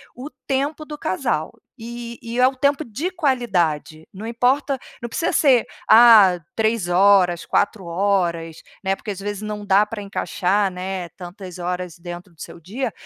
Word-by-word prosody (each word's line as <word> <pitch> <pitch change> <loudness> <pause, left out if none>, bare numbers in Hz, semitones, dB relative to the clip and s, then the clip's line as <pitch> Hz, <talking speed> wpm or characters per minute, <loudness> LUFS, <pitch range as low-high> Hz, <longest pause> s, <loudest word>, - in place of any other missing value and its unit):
o 260 +4 -8 0.2
tempo 280 +3 -1
do 300 -1 -8
casal, 185 - -2 0.3
e 235 +1 -7
e 230 +1 -4
é 250 - +6
o 265 - -2
tempo 280 +3 +1
de 300 - -4
qualidade, 185 - -1
não 200 +3 -9
importa 255 +4 +1 0.2
não 240 - -4
precisa 330 - -1
ser, 260 -6 +4 0.2
ah, 220 -6 +8 0.2
3h, 195 -4 +3
4h, 175 -4 -1 0.2
né, 190 0 +1
porque, 210 - -6
às 195 - -7
vezes, 205 +1 -5
não 210 -1 -5
dá 200 +1 +4
pra 210 0 -7
encaixar, 195 0 0
né, 185 -1 -5
tantas 180 0 -10
horas 180 -1 -4
dentro 175 +1 -9
do 160 - -16
seu - - -9
dia. 210 +11 -4
205 Hz, 155 wpm, -21 LUFS, 180-240 Hz, 0.3 s, ah